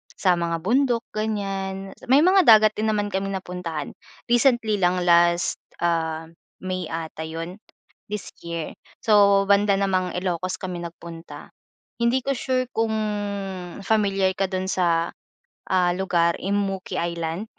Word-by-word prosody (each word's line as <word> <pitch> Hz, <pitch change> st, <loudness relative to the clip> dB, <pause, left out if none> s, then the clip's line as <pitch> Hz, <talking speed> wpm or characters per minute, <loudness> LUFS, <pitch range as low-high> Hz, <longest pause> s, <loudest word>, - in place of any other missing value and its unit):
sa 185 Hz, -, 0 dB
mga 170 Hz, -1 st, -1 dB
bundok 245 Hz, +2 st, +2 dB
ganyan, 195 Hz, -3 st, -3 dB, 0.2 s
may 275 Hz, +5 st, +5 dB
mga 380 Hz, +1 st, +6 dB
dagat 215 Hz, -1 st, +8 dB
din 220 Hz, +1 st, -2 dB
naman 205 Hz, -1 st, 0 dB
kaming 195 Hz, 0 st, -2 dB
napuntahan. 180 Hz, -5 st, -5 dB, 0.4 s
Recently 235 Hz, -4 st, +3 dB
lang 180 Hz, 0 st, +2 dB
last 170 Hz, 0 st, +3 dB, 0.2 s
ah, 160 Hz, -1 st, -1 dB, 0.3 s
May 185 Hz, -3 st, -3 dB
ata 160 Hz, -1 st, -5 dB
yun, 165 Hz, +4 st, -6 dB, 0.5 s
this 210 Hz, -2 st, -5 dB
year. 170 Hz, -2 st, -5 dB, 0.2 s
So 200 Hz, -2 st, +4 dB
banda 200 Hz, 0 st, +3 dB
namang 185 Hz, -2 st, 0 dB
Ilocos 185 Hz, 0 st, -2 dB
kami 180 Hz, -2 st, -5 dB
nagpunta. 170 Hz, 0 st, -10 dB, 0.4 s
Hindi 235 Hz, +2 st, +2 dB
ko 275 Hz, 0 st, -1 dB
sure 255 Hz, 0 st, -1 dB
kung 225 Hz, -2 st, -1 dB, 0.9 s
familiar 195 Hz, -2 st, +2 dB
ka 195 Hz, -, +1 dB
dun 190 Hz, 0 st, -3 dB
sa, 170 Hz, -3 st, +1 dB, 0.6 s
ah, 180 Hz, -1 st, +3 dB
lugar, 175 Hz, -2 st, +1 dB
Immuki 195 Hz, -1 st, -2 dB
Island? 170 Hz, +2 st, -2 dB
190 Hz, 130 wpm, -24 LUFS, 170-210 Hz, 0.9 s, dagat